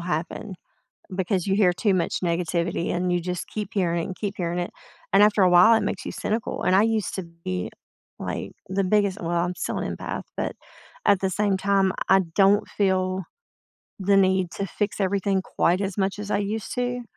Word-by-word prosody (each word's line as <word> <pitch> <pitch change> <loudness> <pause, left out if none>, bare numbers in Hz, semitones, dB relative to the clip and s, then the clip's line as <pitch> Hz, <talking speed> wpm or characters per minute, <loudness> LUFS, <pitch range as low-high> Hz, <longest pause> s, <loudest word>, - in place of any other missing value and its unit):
happen, 175 +4 -3 0.6
because 185 0 -1
you 195 - +2
hear 195 -3 +4
too 195 +2 +1
much 175 - 0
negativity, 170 0 -1
and 180 0 0
you 175 - +1
just 180 0 -4
keep 210 -2 -4
hearing 170 -4 +1
it - - -3
and 185 - -6
keep 205 -1 -3
hearing 175 -1 -2
it, 175 - -2 0.4
and 195 +1 +6
after 210 -1 +5
a 185 - +5
while, 180 +6 +7
it 220 - +2
makes 200 - -3
you - - -5
cynical. 220 +2 -2
And 185 - +2
I 200 - +6
used 220 -3 0
to 190 - -3 0.2
be, 90 -1 -2 0.5
like, - - -4 0.2
the 195 +1 0
biggest 200 0 +2
well, 170 0 0
I'm 180 - -2
still - - -3
an - - -3
empath, - - -5
but - - -2 0.5
at 200 -2 +5
the 190 -1 0
same 200 0 +1
time, 195 -1 +2 0.2
I 190 +1 +6
don't 200 +1 +4
feel 185 -1 0 0.8
the 200 +1 +3
need 190 -2 +3
to 200 - -3
fix 205 +2 -3
everything 195 0 +1
quite 180 0 +1
as 195 0 -2
much 195 +1 0
as 210 0 -6
I - - +2
used 205 +1 -3
to 245 0 -2
190 Hz, 205 wpm, -25 LUFS, 180-205 Hz, 0.8 s, while